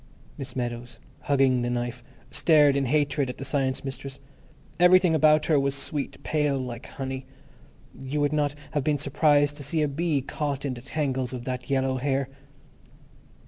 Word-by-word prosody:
Miss 130 Hz, -2 st, -7 dB
Meadows, 120 Hz, -1 st, -4 dB, 0.2 s
hugging 135 Hz, -3 st, +2 dB
the 120 Hz, -, -1 dB
knife, 120 Hz, 0 st, -3 dB, 0.3 s
stared 150 Hz, -4 st, +4 dB
in 140 Hz, -1 st, +1 dB
hatred 145 Hz, -1 st, +1 dB
at 125 Hz, -, -6 dB
the 135 Hz, -, -6 dB
Science 135 Hz, -1 st, -1 dB
Mistress. 135 Hz, 0 st, -6 dB, 0.6 s
Everything 180 Hz, -1 st, +6 dB
about 155 Hz, -1 st, +4 dB
her 155 Hz, -3 st, +3 dB
was 140 Hz, 0 st, 0 dB
sweet, 140 Hz, 0 st, -4 dB
pale, 150 Hz, -2 st, +1 dB
like 125 Hz, -1 st, -6 dB
honey. 130 Hz, -1 st, -6 dB, 0.7 s
You 135 Hz, +3 st, -4 dB
would 145 Hz, 0 st, +1 dB
not 145 Hz, -1 st, 0 dB, 0.2 s
have 145 Hz, -3 st, -1 dB
been 150 Hz, +1 st, +1 dB
surprised 145 Hz, +1 st, +2 dB
to 145 Hz, -, -6 dB
see 155 Hz, +3 st, 0 dB
a -, -, +2 dB
bee 150 Hz, 0 st, 0 dB
caught 145 Hz, +1 st, -3 dB
in 135 Hz, -, -1 dB
the 120 Hz, -, -9 dB
tangles 130 Hz, -2 st, -2 dB
of 125 Hz, -2 st, -5 dB
that 125 Hz, -1 st, -5 dB
yellow 130 Hz, -1 st, +1 dB
hair. 135 Hz, 0 st, -1 dB
140 Hz, 170 wpm, -26 LUFS, 130-150 Hz, 0.7 s, Everything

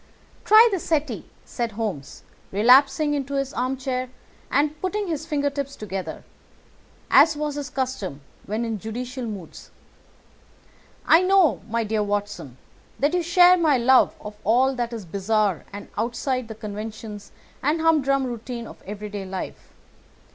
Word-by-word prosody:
"Try 435 Hz, +3 st, +8 dB
the 385 Hz, -, 0 dB
settee," 290 Hz, -, -2 dB, 0.2 s
said 235 Hz, -2 st, -3 dB
Holmes, 200 Hz, -11 st, -5 dB, 0.3 s
relapsing 270 Hz, +8 st, +5 dB
into 280 Hz, -1 st, -2 dB
his 275 Hz, -1 st, -2 dB
armchair 255 Hz, 0 st, -2 dB, 0.4 s
and 300 Hz, +1 st, 0 dB
putting 405 Hz, +3 st, -1 dB
his 320 Hz, -2 st, -3 dB
fingertips 285 Hz, -2 st, -2 dB
together, 190 Hz, -6 st, -6 dB, 0.9 s
as 310 Hz, -2 st, +6 dB
was 300 Hz, 0 st, -2 dB
his 285 Hz, -2 st, -5 dB
custom 250 Hz, -, -3 dB, 0.3 s
when 220 Hz, +3 st, -2 dB
in 225 Hz, -2 st, -3 dB
judicial 245 Hz, +4 st, -5 dB
moods. 195 Hz, -6 st, -9 dB, 1.4 s
"I 330 Hz, -, +6 dB
know, 370 Hz, -, +3 dB
my 230 Hz, +1 st, 0 dB
dear 215 Hz, 0 st, -1 dB
Watson, 205 Hz, -10 st, -3 dB, 0.4 s
that 285 Hz, +4 st, +1 dB
you 360 Hz, -, +2 dB
share 355 Hz, +2 st, +6 dB
my 310 Hz, -6 st, +3 dB
love 255 Hz, +2 st, +4 dB
of 210 Hz, 0 st, -9 dB
all 255 Hz, +5 st, +3 dB
that 240 Hz, -2 st, -3 dB
is 225 Hz, -4 st, -6 dB
bizarre 200 Hz, 0 st, 0 dB
and 205 Hz, 0 st, -8 dB
outside 245 Hz, +2 st, -2 dB
the 220 Hz, -, -8 dB
conventions 210 Hz, -1 st, -7 dB, 0.3 s
and 300 Hz, +4 st, +1 dB
humdrum 280 Hz, -4 st, +3 dB
routine 240 Hz, -1 st, -5 dB
of -, -, -12 dB
everyday 205 Hz, 0 st, -6 dB
life. 190 Hz, 0 st, -7 dB
250 Hz, 140 wpm, -24 LUFS, 210-290 Hz, 1.4 s, Try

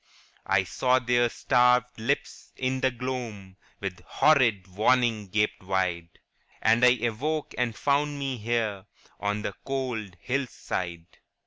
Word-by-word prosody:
* -, -, -32 dB
I 95 Hz, -1 st, +3 dB
saw 125 Hz, +7 st, +2 dB
their 120 Hz, -1 st, +2 dB
starved 125 Hz, -1 st, +2 dB
lips 110 Hz, -, -3 dB
in 130 Hz, 0 st, -1 dB
the 130 Hz, -, +3 dB
gloam 120 Hz, -6 st, -5 dB, 0.2 s
With 95 Hz, -3 st, -5 dB
horrid 120 Hz, -11 st, +3 dB
warning 110 Hz, +2 st, +2 dB
gaped 105 Hz, +2 st, 0 dB
wide, 90 Hz, -3 st, -2 dB, 0.4 s
And 115 Hz, +2 st, +3 dB
I 125 Hz, 0 st, +6 dB
awoke 145 Hz, +7 st, -1 dB
and 120 Hz, -2 st, -1 dB
found 145 Hz, +1 st, +1 dB
me 135 Hz, -2 st, -3 dB
here 110 Hz, -3 st, -2 dB, 0.3 s
On 105 Hz, +1 st, -1 dB
the 100 Hz, -, -3 dB
cold 125 Hz, -8 st, -3 dB
hill 135 Hz, +4 st, -1 dB
side. 85 Hz, -7 st, -5 dB
120 Hz, 135 wpm, -27 LUFS, 100-130 Hz, 0.4 s, I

